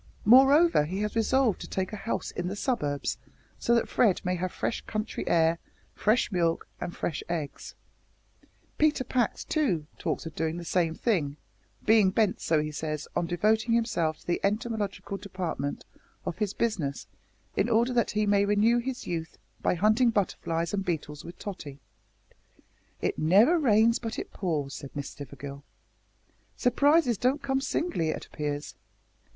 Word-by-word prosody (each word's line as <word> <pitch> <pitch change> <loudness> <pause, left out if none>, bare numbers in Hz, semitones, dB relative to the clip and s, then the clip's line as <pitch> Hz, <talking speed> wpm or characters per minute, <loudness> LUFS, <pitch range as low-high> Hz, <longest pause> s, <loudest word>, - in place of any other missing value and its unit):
Moreover, 270 - +6
he 185 +6 -3
has 210 +1 -2
resolved 230 -1 +2
to - - -6
take 190 +2 -2
a - - -2
house 220 +2 -3
in 175 - -3
the 195 - -3
suburbs, 195 - -1 0.4
so 235 - +2
that 235 - +2
Fred 210 -7 +3
may 180 - +1
have 180 0 -2
fresh - - -2
country 215 0 -3
air, 165 0 +3 0.3
fresh 220 +3 +2
milk, 170 -3 0
and 175 - -5
fresh 160 - -3
eggs. 160 -4 -4 1.0
Peter 300 -3 +3
Pax, 250 -3 0
too, 215 - 0
talks - - -2
of 165 - -6
doing 160 +1 -2
the 175 - -6
same 165 -2 +1
thing, 155 - 0 0.5
being 215 -3 +5
bent, 210 0 +1
so 160 -2 +2
he 150 - -4
says, 155 0 -4
on 170 - 0
devoting 215 +6 +2
himself 170 -9 0
to - - -22
the 175 - 0
entomological 205 -2 -2
department 180 -8 -4 0.4
of 175 - -4
his 205 -2 -1
business, 170 -12 -1 0.5
in 225 - +1
order 235 +2 +3
that 235 -2 +2
he 215 0 0
may 200 -1 +3
renew 210 +4 +3
his 255 +1 -4
youth 165 -2 -4 0.2
by - - +2
hunting 215 +7 +4
butterflies 170 -5 -1
and 195 -1 0
beetles 150 -4 -3
with 175 - -10
Tottie." 150 -9 -7 1.2
"It - - -1
never 210 - +5
rains 230 -4 +4
but 225 -2 -5
it - - -6
pours," 150 -7 -2
said 140 -2 -9
Miss 145 -1 -4
Stivergill. 140 0 -9 1.0
"Surprises 270 - +3
don't 270 +4 +1
come 270 -1 0
singly, 275 - -1
it - - -3
appears. 145 -1 -4
200 Hz, 160 wpm, -28 LUFS, 165-230 Hz, 1.2 s, Moreover